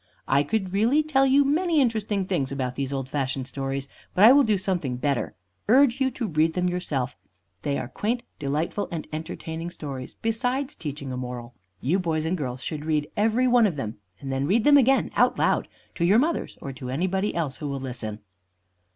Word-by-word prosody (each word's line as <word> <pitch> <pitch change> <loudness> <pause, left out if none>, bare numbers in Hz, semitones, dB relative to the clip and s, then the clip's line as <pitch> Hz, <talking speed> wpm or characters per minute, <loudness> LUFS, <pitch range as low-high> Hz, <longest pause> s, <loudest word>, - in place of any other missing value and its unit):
I 140 +1 +4
could 190 +5 -1
really 235 +10 +3
tell 270 -3 +3
you 280 +2 +5
many 320 +3 +2
interesting 215 -6 +1
things 155 -8 -1
about 130 -2 -2
these 135 +1 -3
old 135 -2 -3
fashioned 135 -2 -2
stories 135 0 -3 0.3
but 185 - +4
I 225 - +10
will 285 +2 +7
do 215 -4 +2
something 175 -10 -1
better 135 -3 -1 0.3
urge 260 +2 +5
you 265 - +3
to 245 -2 -4
read 160 -1 +2
them 180 +1 0
yourself. 155 -8 -2 0.5
They 140 -1 -1
are 125 - -4
quaint, 235 - -2 0.2
delightful, 150 +8 -1
and 165 -2 -4
entertaining 160 +1 -5
stories, 135 -6 -7
besides 250 +5 -1
teaching 145 -3 -6
a 125 - -4
moral. 125 -1 -6 0.3
You 170 +9 +1
boys 160 -3 -1
and 170 +3 0
girls 130 -5 -4
should 150 -2 -4
read 155 -2 -1
every 225 +4 +2
one 240 -3 +5
of 175 - -3
them, 110 -6 -4 0.2
and 135 - -5
then 135 +1 0
read 215 +6 +3
them 290 +2 +6
again, 270 -1 +4
out - - +3
loud, - - +2 0.3
to 170 - -2
your 190 +5 +5
mothers 315 +7 0
or 135 - -5
to 125 -1 -7
anybody 190 +8 -1
else 150 -6 -2
who 150 - -5
will 140 -1 -3
listen. 120 -5 -5
165 Hz, 200 wpm, -25 LUFS, 135-225 Hz, 0.5 s, I